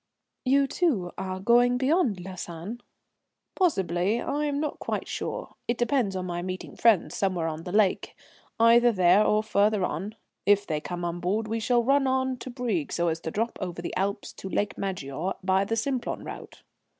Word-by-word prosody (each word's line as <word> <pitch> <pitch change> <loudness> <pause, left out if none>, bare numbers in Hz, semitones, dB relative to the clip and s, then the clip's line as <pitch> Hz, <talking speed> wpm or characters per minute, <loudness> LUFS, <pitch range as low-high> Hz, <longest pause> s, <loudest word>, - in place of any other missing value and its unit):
"You, 275 +2 +4
too, 255 - 0
are 185 0 -4
going 240 +4 +4
beyond 260 - +2
Lausanne?" 185 +4 -7 0.7
"Possibly, 195 - +1
I 295 +4 -1
am 285 -1 -1
not 300 -1 -3
quite - - -3
sure. - - -4
It 240 - 0
depends 240 -5 +1
upon 185 -1 -3
my 175 -1 -3
meeting 185 +1 -6
friends 220 -7 +3
somewhere 185 -4 0
on 160 +1 -5
the 180 - -5
lake, 205 -1 +2 0.4
either 235 +1 +6
there 185 0 +5
or 215 0 +2
further 210 -2 +2
on. 190 +7 -4 0.3
If 205 0 +4
they 155 -4 -2
come 175 +1 -4
on 170 0 -3
board 205 +5 -1
we 225 +1 -1
shall 240 +1 +2
run 275 +2 +3
on 260 0 0
to 255 - -8
Brieg 240 - -2
so 170 0 +1
as 165 0 -2
to 165 - -5
drop 225 +7 -2
over 175 -2 -4
the 170 - -5
Alps 200 +2 -2
to 190 - -8
Lake 205 +2 -1
Maggiore 185 -2 -3
by 190 +1 +3
the 225 - -1
Simplon 255 +1 -2
route." - - -9
205 Hz, 185 wpm, -27 LUFS, 180-245 Hz, 0.7 s, either